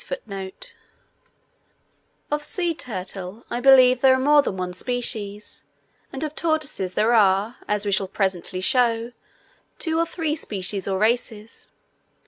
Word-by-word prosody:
Of 295 Hz, 0 st, 0 dB
sea 345 Hz, +3 st, -2 dB
turtle 195 Hz, -, -7 dB
I 240 Hz, -, -1 dB
believe 255 Hz, -1 st, +6 dB
there 265 Hz, -1 st, +6 dB
are -, -, -1 dB
more 290 Hz, +2 st, +5 dB
than 195 Hz, -8 st, -4 dB
one 180 Hz, -1 st, -4 dB
species, 210 Hz, -2 st, -2 dB, 0.5 s
and 270 Hz, +2 st, -4 dB
of 305 Hz, -1 st, -3 dB
tortoises 310 Hz, -, -1 dB
there 225 Hz, +3 st, +3 dB
are, 205 Hz, +2 st, +3 dB
as 210 Hz, 0 st, +1 dB
we 200 Hz, -, 0 dB
shall 195 Hz, 0 st, +1 dB
presently 185 Hz, -2 st, -2 dB
show, 235 Hz, 0 st, +2 dB, 0.7 s
two 320 Hz, -1 st, -1 dB
or 335 Hz, -, +1 dB
three 320 Hz, -3 st, -2 dB
species 195 Hz, -, -2 dB
or 190 Hz, -1 st, 0 dB
races. 220 Hz, 0 st, -2 dB
230 Hz, 130 wpm, -23 LUFS, 195-270 Hz, 0.7 s, believe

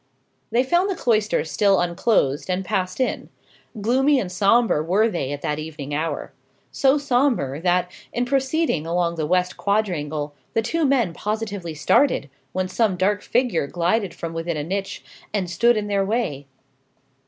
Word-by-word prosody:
They 245 Hz, +2 st, +2 dB
found 345 Hz, +8 st, +2 dB
the 385 Hz, -, -1 dB
cloisters 215 Hz, -, +1 dB
still 200 Hz, 0 st, +3 dB
unclosed, 170 Hz, -, +1 dB
and 185 Hz, +1 st, -1 dB
passed 185 Hz, +2 st, -2 dB
in. 255 Hz, -, -1 dB, 0.5 s
Gloomy 265 Hz, +6 st, +3 dB
and 185 Hz, -7 st, -3 dB
sombre 205 Hz, -1 st, +3 dB
were 190 Hz, +8 st, +2 dB
they 170 Hz, -10 st, -3 dB
at 145 Hz, 0 st, -5 dB
that 150 Hz, 0 st, -1 dB
evening 150 Hz, -2 st, -6 dB
hour. 155 Hz, 0 st, -3 dB, 0.4 s
So 270 Hz, +1 st, +3 dB
sombre 245 Hz, -, +1 dB
that, 180 Hz, 0 st, +1 dB, 0.2 s
in 245 Hz, -, -1 dB
proceeding 270 Hz, -, 0 dB
along 170 Hz, 0 st, 0 dB
the 160 Hz, -2 st, -2 dB
west 180 Hz, +1 st, +1 dB
quadrangle, 155 Hz, -8 st, -1 dB, 0.2 s
the 225 Hz, -, +2 dB
two 330 Hz, +9 st, -2 dB
young 300 Hz, -4 st, +3 dB
men 240 Hz, -11 st, +2 dB
positively 205 Hz, -5 st, -4 dB
started, 155 Hz, -, +2 dB, 0.2 s
when 185 Hz, +3 st, -1 dB
some 205 Hz, -1 st, +1 dB
dark 205 Hz, +3 st, +1 dB
figure 235 Hz, -, 0 dB
glided 180 Hz, +4 st, 0 dB
from 165 Hz, -1 st, -5 dB
within 165 Hz, 0 st, -3 dB
a 145 Hz, -, -2 dB
niche, 195 Hz, +4 st, -4 dB, 0.3 s
and 190 Hz, -3 st, 0 dB
stood 235 Hz, +7 st, +3 dB
in 210 Hz, -, -1 dB
their 200 Hz, -1 st, +1 dB
way. 195 Hz, -, -2 dB
190 Hz, 165 wpm, -23 LUFS, 165-235 Hz, 0.5 s, still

